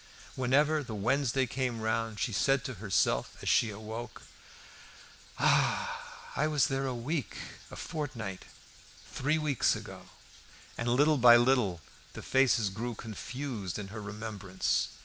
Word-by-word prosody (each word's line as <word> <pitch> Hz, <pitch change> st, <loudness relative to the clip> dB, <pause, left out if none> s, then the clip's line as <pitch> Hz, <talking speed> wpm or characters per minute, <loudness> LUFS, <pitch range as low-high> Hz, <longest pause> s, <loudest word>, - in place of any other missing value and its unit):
Whenever 145 Hz, +4 st, +3 dB
the 120 Hz, -6 st, -6 dB
Wednesday 130 Hz, +4 st, +1 dB
came 125 Hz, -1 st, -2 dB
round 110 Hz, 0 st, -1 dB
she 115 Hz, -, -1 dB
said 135 Hz, +5 st, +2 dB
to 130 Hz, -3 st, -4 dB
herself 95 Hz, -, +1 dB
as -, -, -5 dB
she 115 Hz, -, +4 dB
awoke, 110 Hz, +3 st, -7 dB, 1.1 s
"Ah! -, -, 0 dB
I 150 Hz, -, +2 dB
was 150 Hz, -3 st, +2 dB
there 135 Hz, 0 st, -1 dB
a 130 Hz, -, -2 dB
week 130 Hz, -, -3 dB, 0.3 s
a -, -, -9 dB
fortnight 130 Hz, -, -5 dB, 0.7 s
three 150 Hz, +4 st, +1 dB
weeks 150 Hz, -5 st, +2 dB
ago." -, -, -9 dB, 0.7 s
And 120 Hz, -, -3 dB
little 145 Hz, +5 st, +4 dB
by 120 Hz, -1 st, +9 dB
little 120 Hz, -9 st, +2 dB, 0.3 s
the -, -, -8 dB
faces 125 Hz, -6 st, +3 dB
grew 115 Hz, +4 st, -4 dB
confused 115 Hz, -, -5 dB
in 100 Hz, -2 st, -6 dB
her 110 Hz, +1 st, -7 dB
remembrance. 100 Hz, -2 st, -2 dB
120 Hz, 135 wpm, -31 LUFS, 110-135 Hz, 1.1 s, by